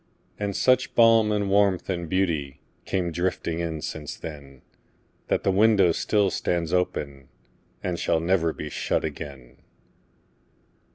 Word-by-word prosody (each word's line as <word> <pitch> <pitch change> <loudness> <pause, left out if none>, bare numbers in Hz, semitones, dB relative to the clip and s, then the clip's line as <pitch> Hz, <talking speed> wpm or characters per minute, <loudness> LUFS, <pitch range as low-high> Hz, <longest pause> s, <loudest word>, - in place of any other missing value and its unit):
And 100 -2 -2
such 130 0 +2
balm 115 -2 +5
and 105 -1 0
warmth 100 -2 +2
and 85 -3 -3
beautyCame 85 0 -2
drifting 85 -1 -2
in 80 -2 -3
since 75 -2 -5
then, 70 -4 -10 0.6
That - - 0
the 95 - +2
window 100 -2 +4
still 100 +3 +1
stands 85 -1 -1
openAnd 70 -7 -2 0.7
shall 80 - +1
never 85 -1 +1
be 75 -1 -7
shut - - -1
again. 70 -4 -8
85 Hz, 120 wpm, -25 LUFS, 75-100 Hz, 0.7 s, balm